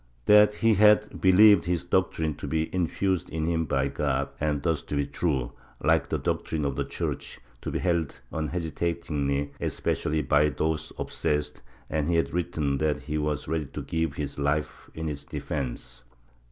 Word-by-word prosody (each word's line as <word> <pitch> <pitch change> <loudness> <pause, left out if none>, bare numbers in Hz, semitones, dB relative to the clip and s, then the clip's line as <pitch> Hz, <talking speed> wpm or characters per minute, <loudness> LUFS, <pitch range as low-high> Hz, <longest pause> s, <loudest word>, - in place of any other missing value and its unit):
That 105 0 +6
he 115 +1 +3
had 105 +1 +4
believed 95 0 +7
this 90 -1 -1
doctrine 85 -3 +1
to - - -6
be 80 0 -1
infused 95 0 0
in 80 0 -2
him 80 -1 0
by 70 -2 +1
God, - - -1
and 75 -1 0
thus 80 -3 +1
to - - -5
be 70 0 +1
true, 70 -3 -1 0.3
like - - +2
the - - 0
doctrine 75 -2 -2
of 70 -1 -1
the - - 0
Church, - - -4 0.2
to - - -4
be - - -2
held 85 -4 -1
unhesitatingly, 80 -3 -2
especially 75 +1 -1
by 75 +3 +4
those 80 +1 -2
obsessed, 75 0 -1 0.3
and 75 0 -1
he 85 - +2
had 70 -4 +1
written 80 -5 -1
that 75 -2 0
he 75 0 -3
was 75 -1 -2
ready 80 -1 -1
to - - -6
give 80 -3 -1
his 75 -1 -4
life 70 +2 -1
in 80 0 -3
its 75 -2 -4
defence 65 -3 -5
80 Hz, 170 wpm, -27 LUFS, 75-85 Hz, 0.3 s, believed